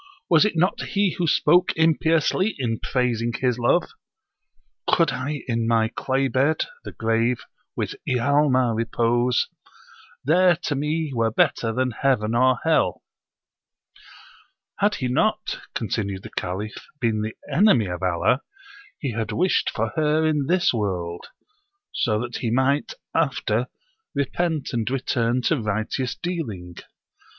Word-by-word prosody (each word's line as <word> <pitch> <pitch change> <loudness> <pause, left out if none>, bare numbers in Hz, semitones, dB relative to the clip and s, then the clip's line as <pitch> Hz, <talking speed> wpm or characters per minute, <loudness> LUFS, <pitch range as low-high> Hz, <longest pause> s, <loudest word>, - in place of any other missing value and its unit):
Was 165 +4 +6
it 210 - 0
not 180 +4 +1
he 200 -2 0
who 170 - +1
spoke 175 +4 +4
impiously 165 +5 +2
[in 115 -5 -2
praising 120 -2 -1
his 125 -1 0
love]? 120 +9 +2 1.0
'Could 165 -2 +3
I 145 +3 -4
in 115 -2 0
my 115 -1 +2
clay 135 +3 0
bed 140 +4 +1 0.2
[the - - -7
grave] 115 +2 0 0.3
with - - -2 0.2
Ialma 130 -1 +2
repose, 120 +2 +1 0.8
There 175 +5 +4
to 150 - 0
me 150 +2 -1
were 115 -2 +1
better 115 +1 +1
than 125 +2 0
Heaven 115 -3 +1
or 130 +1 +4
Hell!' 160 -1 +1 1.8
Had 205 0 +2
he 130 - -2
not 215 +12 0 0.2
[continued 100 -4 -2
the - - -9
Caliph] 100 +4 -4 0.2
been 110 -4 0
the 110 +1 -4 0.2
enemy 180 - +5
of 90 -1 -5
Allah, 90 +8 +1 0.6
he 140 - -3
had 110 -1 -3
wished 185 +2 +1
for 115 0 -2
her 155 0 +2
in 150 -3 +1
this 175 -2 +3
world; 90 -6 -3 0.6
so 110 -2 0
that 120 -1 -4
he 115 - -2
might, 130 - +1 0.2
after, - - 0 0.5
repent 155 +2 -1
and 115 -1 -1
return 125 -2 0
to 150 0 +1
righteous 110 +4 -2
dealing. 110 - -5
125 Hz, 135 wpm, -23 LUFS, 115-155 Hz, 1.8 s, Was